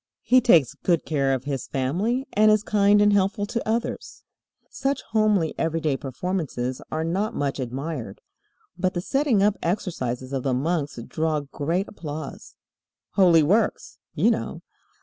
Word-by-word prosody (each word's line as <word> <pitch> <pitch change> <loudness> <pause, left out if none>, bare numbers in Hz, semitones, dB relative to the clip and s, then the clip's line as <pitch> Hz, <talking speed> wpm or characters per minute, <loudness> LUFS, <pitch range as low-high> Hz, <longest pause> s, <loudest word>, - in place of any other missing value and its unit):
He 255 +1 +5
takes 165 - +4
good 170 +2 0
care 140 -4 +1
of 130 -1 -1
his 140 -2 -4
family, 190 - -1
and 215 +1 +5
is 215 -1 +4
kind 205 -1 +4
and 205 0 +4
helpful 200 +1 +1
to 220 +1 -3
others. 230 +1 -3 0.5
Such 275 +1 -2
homely, 215 -7 +2
everyday 160 -3 0
performances 135 -3 -3
are 160 +1 -1
not 190 +6 -1
much 140 -1 -2
admired. 130 -3 -5 0.6
But 185 +1 -1
the 175 - -1
setting 260 -1 +1
up 205 0 +2
exercises 130 - -3
of 135 - -1
the 130 -1 0
monks 150 +1 -1
draw 155 -1 -1
great 160 +7 -2
applause. 155 -6 -8 0.6
Holy 175 -5 +5
works, 205 +10 0 0.2
you - - +3
know. - - -4
165 Hz, 150 wpm, -24 LUFS, 140-205 Hz, 0.6 s, He